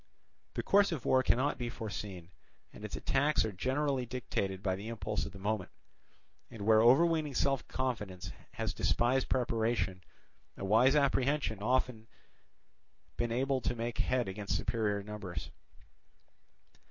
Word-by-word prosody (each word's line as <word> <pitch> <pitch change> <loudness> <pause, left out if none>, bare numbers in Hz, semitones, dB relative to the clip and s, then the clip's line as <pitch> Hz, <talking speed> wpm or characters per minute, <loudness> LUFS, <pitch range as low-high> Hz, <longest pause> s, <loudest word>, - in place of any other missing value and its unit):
The - - -1
course 200 -1 +4
of 155 -7 -4
war 130 - +4
cannot 130 +3 +1
be 120 -1 -2
foreseen, 100 -7 -6 0.4
and - - -11
its 105 - -4
attacks 140 -1 +2
are 110 - -2
generally 130 +6 0
dictated 100 -6 -3
by 95 -3 +1
the 100 +3 -7
impulse 110 -2 -3
of - - -9
the 100 - -10
moment; 100 -1 -2 0.8
and 110 -3 -8
where 110 0 +6
overweening 150 +4 +4
self 135 +1 +1
confidence 105 -8 -3 0.2
has - - -2
despised 125 +2 +1
preparation, 115 -6 0 0.5
a - - -4
wise 120 +8 +5
apprehension 140 -5 +1
often 125 -1 0 1.1
been 120 -1 -1
able 130 +2 +1
to 120 - -1
make 115 0 -4
head 125 -3 +1
against 100 +1 -2
superior 105 -3 -1
numbers. 100 -8 -6
115 Hz, 140 wpm, -32 LUFS, 105-130 Hz, 1.1 s, where